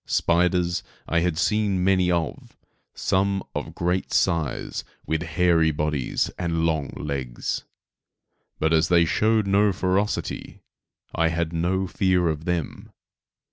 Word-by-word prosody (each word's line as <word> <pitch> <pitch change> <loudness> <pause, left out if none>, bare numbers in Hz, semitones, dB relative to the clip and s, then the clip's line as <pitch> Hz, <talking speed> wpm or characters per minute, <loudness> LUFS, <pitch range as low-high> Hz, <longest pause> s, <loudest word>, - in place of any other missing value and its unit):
Spiders, 85 0 +2 0.3
I 85 - +2
had 85 -2 0
seen 100 0 +1
many 95 -1 +3
of, 85 -2 -2 0.4
some 95 0 0
of - - -5
great 90 +2 -1
size 85 -7 0 0.2
with 80 0 -1
hairy 85 -1 +2
bodies 75 -3 -1
and 85 -2 0
long 80 -4 0
legs; 70 -4 -4 0.9
but 80 +1 +1
as 80 0 +4
they 85 -1 +4
showed 110 +5 +2
no 100 +1 +3
ferocity, 95 +2 -2 0.5
I 80 - +2
had 85 0 -1
no 90 +3 0
fear 90 -1 +1
of 80 0 -3
them. 85 -4 -3
85 Hz, 125 wpm, -24 LUFS, 80-95 Hz, 0.9 s, as